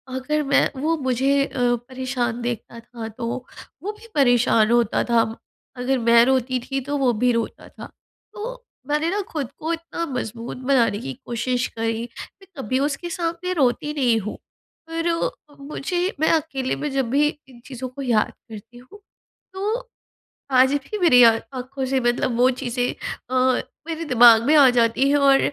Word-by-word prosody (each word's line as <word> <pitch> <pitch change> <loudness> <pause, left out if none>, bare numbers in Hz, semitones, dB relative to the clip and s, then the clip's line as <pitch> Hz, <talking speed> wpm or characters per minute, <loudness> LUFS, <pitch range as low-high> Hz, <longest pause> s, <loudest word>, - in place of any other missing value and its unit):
अगर 300 +4 -1
मैं 280 0 +3
वो 325 +2 +1
मुझे 270 +1 +1
अ, - - -12 0.4
परेशान 255 -2 -3
देखता 235 -1 -5
था 230 -1 -8
तो 230 +2 -7 0.6
वो 415 - -2
भी 460 - -14
परेशान 245 -4 +4
होता 235 -2 +2
था, 235 -1 +3 0.5
अगर 255 +2 0
मैं 235 0 +5
रोती 255 -1 +1
थी, 270 +2 -4
तो 290 +2 -3
वो 265 -3 +2
भी 245 +3 +2
रोता 230 -1 -3
था। - - -11 0.5
तो - - -7 0.2
मैंने 300 +3 0
ना 405 - -1
ख़ुद 280 -5 -4
को 320 +2 -3
इतना 335 0 -4
मज़बूत 240 -4 -5
बनाने 240 -6 +3
की 135 - -5
कोशिश 245 +1 -1
करी। 225 0 -1 0.4
मैं 385 - -17
कभी 260 0 -1
उसके 295 +5 -2
सामने 345 0 -3
रोती 295 -1 +1
नहीं 245 -6 +2
हूँ, 210 - -6 0.5
पर 330 -2 -3
मुझे 300 +4 -4 0.2
मैं 315 - +3
अकेले 285 -5 -1
में 300 - -3
जब 270 -3 -1
भी 290 +3 +3 0.2
इन 240 -2 -15
चीज़ों 255 -1 -6
को 275 +2 -9
याद 235 -5 +1 0.2
करती 225 +3 -11
हूँ, 370 +12 -15 0.5
तो 440 +6 -3 0.6
आज 260 +1 +5
भी 425 - -5
मेरी 310 -9 +6
आ 230 - +8 0.2
आँखों 260 +1 -5
से 265 0 +1
मतलब 240 0 0
वो 250 +1 +5
चीज़ें 245 0 -1 0.4
अ, 255 0 +2 0.3
मेरे 330 0 -3
दिमाग 235 -4 +7
में 305 - +4
आ 280 -3 +8
जाती 230 +4 +2
हैं 290 - +4
और 275 -1 +5
260 Hz, 170 wpm, -22 LUFS, 240-300 Hz, 0.6 s, आ